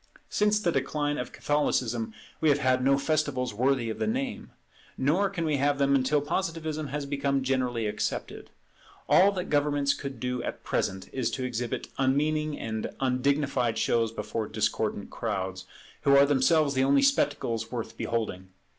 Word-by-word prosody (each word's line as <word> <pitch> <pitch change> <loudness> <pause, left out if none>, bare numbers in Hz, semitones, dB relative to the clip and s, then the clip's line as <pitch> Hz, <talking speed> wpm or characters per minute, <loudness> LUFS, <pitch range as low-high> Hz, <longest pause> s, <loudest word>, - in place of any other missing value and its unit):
Since 210 0 +3
the 175 -5 +1
decline 145 +1 -1
of 125 - -4
Catholicism 120 -6 0 0.3
we 160 - +3
have 145 - +4
had 130 -2 +2
no 135 +1 +4
festivals 140 -5 0
worthy 125 0 +1
of - - -7
the - - 0
name; 260 +4 -3 0.5
nor 170 +9 +2
can 175 -4 -3
we 150 -2 +1
have 145 +1 +2
them 140 0 +2
until 140 +2 +2
Positivism 160 -1 -2
has 145 +1 -3
become 140 -1 0
generally 125 -3 0
accepted. 105 - -3 0.6
All 195 +2 +6
that 180 -2 -4
governments 145 -1 +2
could 135 -4 -7
do 125 0 -2
at - - -5
present 95 0 -2
is 130 -3 0
to 130 - -4
exhibit 120 -1 -3
unmeaning 150 +3 +1
and 110 -1 -3
undignified 130 -2 +1
shows 115 0 +1
before 105 0 -4
discordant - - -1
crowds, 95 -4 -3 0.3
who 140 - +4
are 140 - +7
themselves 145 +1 +3
the 130 0 +2
only 140 - +4
spectacles 130 - +1
worth 120 -3 -5
beholding. 100 -5 -3
140 Hz, 160 wpm, -28 LUFS, 120-150 Hz, 0.6 s, are